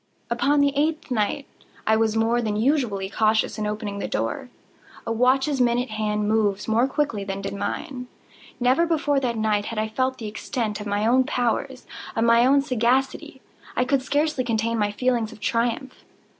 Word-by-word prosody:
Upon 280 +5 +2
the 285 -1 +3
eighth 310 0 -1
night 235 +4 0 0.4
I 220 - +4
was 220 0 +1
more 230 +2 +2
than 215 -2 -1
usually 225 -5 +1
cautious 220 +2 +1
in 210 - -1
opening 210 -1 -4
the - - -3
door. 115 - -3 0.6
A 230 - -2
watch's 260 +4 +2
minute 245 0 +1
hand 210 -1 -1
moves 210 -2 +1
more 230 +3 +3
quickly 270 -7 -1
than 195 0 -4
did 195 - -5
mine. 250 +5 -4 0.5
Never 260 +7 +3
before 305 -4 +1
that 240 -3 -2
night 215 -1 +1
had 230 - -5
I 215 0 0
felt 260 +4 -1
the 230 - -7
extent 215 0 -3
of 210 - -6
my 205 +1 0
own 255 +3 +4
powers—of 250 -2 -2
my 235 +4 +5
sagacity. 255 0 0 0.3
I 250 - +2
could 275 +1 +1
scarcely 290 0 0
contain 230 -1 -1
my 205 -1 +1
feelings 235 0 0
of 225 - -13
triumph. 235 +4 -2
235 Hz, 170 wpm, -24 LUFS, 215-260 Hz, 0.6 s, my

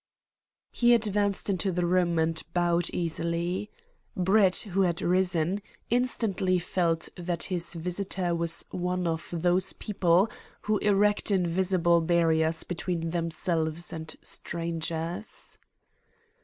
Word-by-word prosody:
He 240 0 +4
advanced 205 -3 0
into 190 -1 0
the 180 0 0
room 175 -1 +2
and 160 0 +1
bowed 175 -1 +2
easily. 170 +3 -2 0.5
Brett, 190 +1 +4 0.2
who 195 - +3
had 175 -3 +1
risen, 180 +1 +1 0.3
instantly 220 -7 +1
felt 170 -2 0
that 175 -1 -2
his 170 -1 -2
visitor 180 +1 -2
was 170 0 0
one 180 0 -2
of 165 -1 -2
those 175 +2 +1
people 185 -1 +2 0.4
who 215 -1 +1
erect 205 +1 +2
invisible 180 -2 +2
barriers 160 -1 +2
between 170 -2 -3
themselves 165 0 -1
and 160 0 -6
strangers. 170 +3 -4
175 Hz, 110 wpm, -28 LUFS, 170-190 Hz, 0.5 s, He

